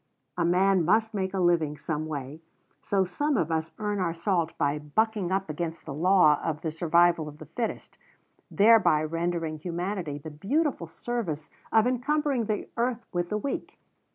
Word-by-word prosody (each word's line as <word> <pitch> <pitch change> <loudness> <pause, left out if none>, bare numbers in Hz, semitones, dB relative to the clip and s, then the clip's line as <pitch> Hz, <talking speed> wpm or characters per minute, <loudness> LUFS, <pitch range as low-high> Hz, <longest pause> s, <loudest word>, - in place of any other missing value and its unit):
A 175 - 0
man 185 +1 +3
must 220 +6 +2
make 190 -2 -1
a 195 - -2
living 165 -4 +2
some 155 +1 -3
way, 145 0 -6 0.4
so 195 -1 +1
some 290 +10 0
of 165 -4 0
us 160 0 -1
earn 210 -1 -2
our 170 -3 -1
salt 170 -1 -1
by 145 +1 0
bucking 200 +5 0
up 195 0 0
against 165 +2 -4
the 155 - -5
law 170 -1 +4
of 155 -2 -2
the 160 - -2
survival 170 0 +3
of 150 0 -9
the 155 - -10
fittest, 225 - -5 0.5
thereby 205 -7 +5
rendering 165 0 -2
humanity 175 -2 -3
the 155 +2 -8
beautiful 245 - -1
service 165 -6 -4 0.2
of 220 0 +5
encumbering 265 0 0
the 210 -1 -2
earth 240 0 -1
with 175 -1 -1
the 210 - 0
weak. 270 +6 -4
175 Hz, 170 wpm, -27 LUFS, 155-210 Hz, 0.5 s, thereby